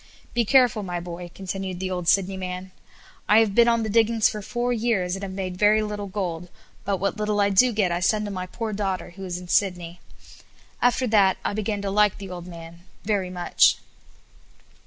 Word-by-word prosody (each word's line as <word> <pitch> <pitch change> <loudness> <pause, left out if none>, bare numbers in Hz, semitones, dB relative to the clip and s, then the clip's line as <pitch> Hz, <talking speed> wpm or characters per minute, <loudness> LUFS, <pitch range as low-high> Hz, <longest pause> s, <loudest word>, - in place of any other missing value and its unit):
Be 235 -1 +1
careful, 250 -3 +4
my 180 -3 -4
boy," 175 0 -7
continued 190 -1 -5
the 185 0 -3
old 180 -2 -3
Sydney 195 +1 +3
man; 185 0 -6 0.6
"I 210 - +6
have 220 -3 +4
been 235 +2 +5
on 230 -1 +2
the - - -2
diggings 225 0 +3
four 240 +4 -2
years, 215 -6 0
and 195 - -7
have 195 -1 -5
made 185 -1 -5
very 210 +2 +4
little 210 -1 -4
gold; 180 -3 -4 0.3
but 200 -1 -1
what 195 +3 -2
little 210 -1 -1
I 200 0 +3
do 245 +6 +5
get 205 -5 +1
I 170 - 0
send 210 +4 +1
to 205 - -5
my 185 -1 -5
poor 220 +3 -5
daughter, 195 -3 -3
who 195 +2 -10
is 175 -1 -4
in 180 0 -9
Sydney." 175 -2 0 0.8
After 245 +1 +2
that 205 -5 +3
I - - 0
began 210 -1 -2
to 195 - -2
like 210 0 +3
the 195 -2 -8
old 175 -1 -7
man 170 -1 -10 0.2
very 200 -3 -1
much. 180 -1 +3
195 Hz, 200 wpm, -24 LUFS, 180-215 Hz, 0.8 s, I